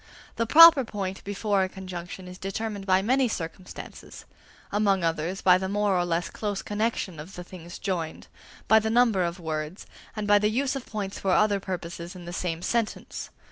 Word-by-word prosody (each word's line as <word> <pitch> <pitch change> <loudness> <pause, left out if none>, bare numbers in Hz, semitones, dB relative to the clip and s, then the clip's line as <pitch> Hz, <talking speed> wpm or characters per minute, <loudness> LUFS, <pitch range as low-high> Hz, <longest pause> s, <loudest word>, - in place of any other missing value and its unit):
The 230 - 0
proper 325 0 +9
point 195 -4 -5
before 205 0 0
a 190 - 0
conjunction 185 -1 -8
is 180 0 -10
determined 200 +1 -4
by 190 0 +4
many 260 +4 +3
circumstances: 180 -2 -7 0.5
among 200 -3 +2
others, 165 +3 -1
by 180 -1 +6
the 190 0 -3
more 205 -1 +1
or 175 -1 +1
less 170 0 -1
close 205 -2 -3
connexion 210 -5 -2
of 165 +6 -9
the 180 - -7
things 175 -1 -10
joined, 170 -5 -3 0.4
by 220 - +7
the 220 0 -2
number 225 -5 +3
of 170 +1 -3
words, 155 +1 -4 0.3
and 215 -1 -3
by 205 0 +5
the 210 +1 +2
use 265 +5 0
of 270 - -6
points 200 -3 -4
for 195 - -2
other 205 0 +3
purposes 175 -1 -6
in 180 -1 -10
the 175 - -7
same 175 -2 -3
sentence. 230 0 -2
195 Hz, 185 wpm, -26 LUFS, 175-215 Hz, 0.5 s, proper